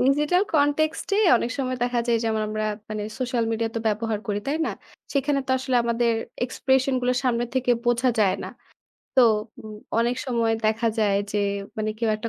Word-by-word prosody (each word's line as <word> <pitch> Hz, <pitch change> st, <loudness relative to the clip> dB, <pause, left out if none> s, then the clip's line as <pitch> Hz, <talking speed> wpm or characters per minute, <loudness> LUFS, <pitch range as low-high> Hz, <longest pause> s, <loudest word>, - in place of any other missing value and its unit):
Digital 295 Hz, +8 st, +3 dB
context 300 Hz, +1 st, +2 dB
এ -, -, +2 dB, 0.2 s
অনেক 235 Hz, -, -2 dB
সময় 255 Hz, -1 st, -1 dB
দেখা 245 Hz, -1 st, +1 dB
যায় 235 Hz, -1 st, +3 dB
যেমন 220 Hz, -1 st, 0 dB
আমরা 215 Hz, 0 st, -2 dB, 0.3 s
মানে 215 Hz, -1 st, -3 dB, 0.2 s
সোশ্যাল 250 Hz, -2 st, 0 dB
মিডিয়া 225 Hz, 0 st, -1 dB
তো 230 Hz, -, -1 dB
ব্যবহার 215 Hz, 0 st, -1 dB
করি। 205 Hz, -1 st, -1 dB
তাই 285 Hz, -, 0 dB
না? -, -, -1 dB, 0.4 s
সেখানে 280 Hz, 0 st, +1 dB
তো -, -, -3 dB
আসলে 260 Hz, -1 st, 0 dB
আমাদের 235 Hz, 0 st, +1 dB, 0.3 s
এক্সপ্রেশন 265 Hz, +1 st, +1 dB
গুলো 250 Hz, 0 st, +1 dB
সামনের 240 Hz, -2 st, 0 dB
থেকে 255 Hz, -1 st, +1 dB, 0.2 s
বোঝা 240 Hz, +1 st, +3 dB
যায় 190 Hz, -3 st, +4 dB
না। -, -, -5 dB, 0.7 s
তো -, -, +8 dB, 0.4 s
উম 215 Hz, -1 st, -9 dB, 0.2 s
অনেক 240 Hz, +2 st, +1 dB
সময় 230 Hz, -2 st, +1 dB
দেখা 220 Hz, +2 st, +1 dB
যায় 205 Hz, -2 st, +3 dB, 0.2 s
যে, 210 Hz, -, +1 dB, 0.4 s
মানে 215 Hz, 0 st, 0 dB
কেউ 230 Hz, -1 st, 0 dB
একটা 220 Hz, +2 st, -5 dB
240 Hz, 185 wpm, -24 LUFS, 225-260 Hz, 0.7 s, তো